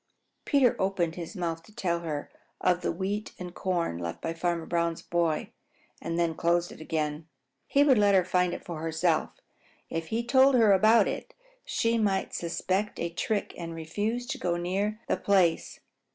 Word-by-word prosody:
Peter 270 -4 +4
opened 190 -4 0
his 170 +4 -7
mouth 165 -3 -2
to 165 - -19
tell 175 -5 -1
her 155 -4 -5 0.3
of 180 -1 +2
the - - 0
wheat 200 +4 -3
and 180 -1 -7
corn 175 - -1
left 85 -1 -4
by 165 - -3
Farmer 170 0 -1
Brown's 170 -1 -1
boy 170 -3 0 0.5
and 165 0 -3
then 170 -1 +1
closed 170 +2 +1
it - - -11
again. 155 0 -2 0.4
He 280 - +4
would 265 -6 +5
let 205 -1 +5
her 185 -2 +4
find 180 -1 +2
it - - -10
for 170 -3 -5
herself. 160 0 0 0.6
If 165 0 -3
he 225 +5 -1
told 265 +2 +5
her 220 -4 +6
about 215 +4 +5
it, - - -5 0.3
she 230 0 +1
might 195 -3 0
suspect 185 +4 -2
a 170 - -2
trick 205 +3 -1
and 165 -1 -5
refuse 210 +9 -2
to - - -3
go 175 -1 0
near 195 +5 -1
the - - +1
place. 185 -5 +1
175 Hz, 180 wpm, -28 LUFS, 165-205 Hz, 0.6 s, her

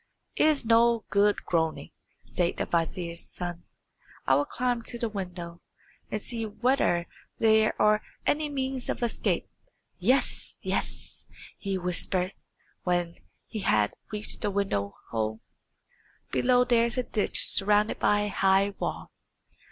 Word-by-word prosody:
"It - - +4
is 295 -5 +2
no 230 0 +4
good 205 0 +3
groaning," 160 -2 -1 0.3
said 175 -1 -1
the - - -1
vizier's 170 0 -1
son. 175 -1 -6 0.6
"I 135 - +4
will 145 +2 +3
climb 245 +4 -1
to 240 - -4
the 235 - -1
window, 180 -4 -6 0.5
and 215 - -2
see 230 +2 -4
whether 220 -5 +1 0.3
there 220 -1 +3
are 210 0 +4 0.2
any 300 0 +1
means 265 -2 -3
of - - -2
escape. 235 - 0 0.5
Yes! 250 +9 +1
yes!" - - -4 0.3
he 195 -1 -2
whispered, 180 +1 -1 0.5
when 175 -1 -1 0.3
he 220 - -6
had 105 - +2 0.2
reached 210 0 -5
the - - 0
window 190 - -1 0.2
hole. 110 -1 -1 0.9
"Below 250 0 +4
there 235 -2 +4
is 235 +2 -1
a 250 - +1
ditch 215 -3 +1
surrounded 210 +2 +3
by 205 0 +3
a 205 - -1
high 195 +1 +3
wall. - - -4
205 Hz, 135 wpm, -28 LUFS, 175-235 Hz, 0.9 s, It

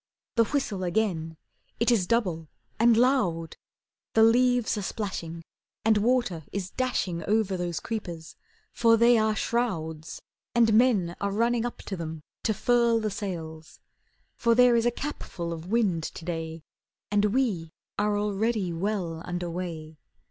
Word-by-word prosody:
The 230 -1 +4
whistle 215 -8 -2
again: 175 -4 -1 0.4
It 235 +2 +3
is 200 -7 +2
double 180 -9 0 0.3
and 230 0 +5
loud! 185 -11 +2 0.6
The 220 - +6
leaves 245 +1 +4
are 210 - -3
splashing, 170 -5 -4 0.4
And 220 -1 +5
water 230 -7 +1
is 195 -1 -4
dashing 190 -10 -1
Over 210 -2 +1
those 175 -2 -2
creepers, 175 -8 -6 0.4
for 230 -1 +4
they 235 0 +5
are 220 0 +2
shrouds; 160 -11 -2 0.4
And 230 -2 +4
men 210 -7 +3
are 200 0 0
running 235 +3 +1
up 240 - -9
them 160 -5 -5 0.2
to 220 - +2
furl 235 0 +3
the 215 -1 -2
sails, 165 -6 -6 0.6
For 235 -1 +3
there 250 0 +6
is 230 0 +3
a - - +3
capful 190 -11 -5
of 165 +1 -8
wind 205 -7 +2
to 160 - -7
day, 165 -2 -4 0.5
And 205 0 +3
we 210 -8 0 0.3
are 205 0 +1
already 205 -2 0
well 175 -2 -2
under 175 -1 -4
way. 160 -3 -6
205 Hz, 145 wpm, -27 LUFS, 170-230 Hz, 0.6 s, The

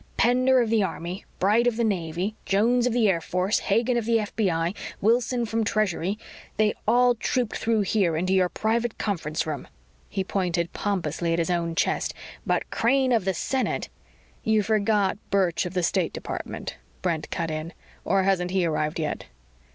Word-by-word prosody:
"Pender 255 +2 +4
of 225 -2 0
the 225 -2 +4
Army, 180 +1 -4
Bright 215 +6 +3
of 235 -2 +1
the 235 - +1
Navy, 185 -1 -1
Jones 235 +5 +2
of - - +1
the 235 -3 +3
Air 175 -4 +2
Force, 185 +4 0
Hagen 230 +4 +1
of 235 - -1
the 230 0 +3
FBI, 185 -5 0 0.3
Wilson 235 +2 +2
from 225 +1 0
Treasury 205 -3 0 0.4
they 215 -1 +3
all 245 +2 +5
trooped 240 0 -1
through 225 -2 +1
here 190 -5 +1
into 185 +3 0
your 185 -1 +3
private 225 +3 -1
conference 165 -7 -2
room." 155 -2 -4 0.4
He 195 - -1
pointed 180 -3 -1
pompously 170 -4 -1
at - - +1
his 170 +1 0
own 170 -1 -1
chest. - - 0 0.3
"But - - 0
Crane 260 +2 +2
of 225 -6 +2
the 190 -1 0
Senate 260 +9 -1 0.3
" - - -32
"You 215 -1 +4
forgot 210 -2 +1
Birch 185 -3 +1
of 180 - -9
the 180 - +1
State - - +1
Department," - - -5 0.3
Brent 160 -2 -1
cut 165 -1 -2
in. 155 +2 -4 0.3
"Or 195 +1 +2
hasn't 185 -2 +1
he 185 -1 +1
arrived 155 -1 -1
yet?" 155 -2 -3
200 Hz, 175 wpm, -25 LUFS, 175-225 Hz, 0.4 s, all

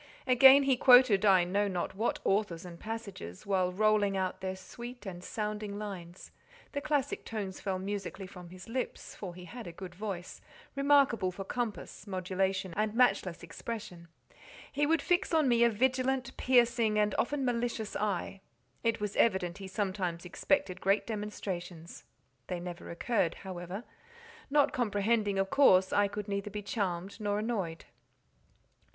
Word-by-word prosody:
Again 265 +2 +8
he 270 -2 +3
quoted 245 -6 +7
I 190 -3 +6
know 200 +4 +1
not 180 -3 -2
what 220 +5 0
authors 195 -4 0
and 170 -1 -10
passages, 210 - -7
and - - -15
while 185 -2 +2
rolling 205 0 +2
out 190 0 -2
their 190 0 -3
sweet 240 +5 -10
and 180 -2 -7
sounding 210 -1 -4
lines 185 -4 -8 0.4
(the 285 - -3
classic 290 -3 -1
tones 200 -4 -5
fell 190 -1 -2
musically 195 0 -4
from 180 -2 -11
his 185 +1 -11
lips—for 225 -6 -5
he 180 0 -10
had 235 +2 -9
a - - -6
good 180 +1 -9
voice—remarkable 215 +5 0
for 195 +2 -6
compass, 220 -2 -4
modulation, 190 0 -1
and 215 +1 0
matchless 215 -8 +2
expression), 185 -7 -7 0.6
he 290 +1 +1
would 320 -2 +2
fix 350 -1 +1
on 310 -3 +4
me 235 -1 +4
a 235 - +6
vigilant, 255 +3 0
piercing, 235 -3 +3
and 210 -1 +2
often 275 +1 0
malicious 235 -3 -2
eye. 195 -1 -2 0.4
It 230 -1 +1
was 210 -1 -3
evident 190 -4 +2
he 195 - -7
sometimes 185 -3 -2
expected 185 0 0
great 195 +2 +2
demonstrations; 185 -6 -6 0.4
they 180 - -3
never 175 0 -7
occurred, 175 0 0
however; 185 +2 -6 0.7
not 290 0 +3
comprehending, 210 -2 +1
of 195 0 0
course 190 -10 +5
I 205 0 +4
could 205 +1 -6
neither 200 0 -2
be 210 0 -6
charmed 195 -2 -3
nor 205 -1 0
annoyed. 205 -7 -3
205 Hz, 150 wpm, -31 LUFS, 185-235 Hz, 0.7 s, Again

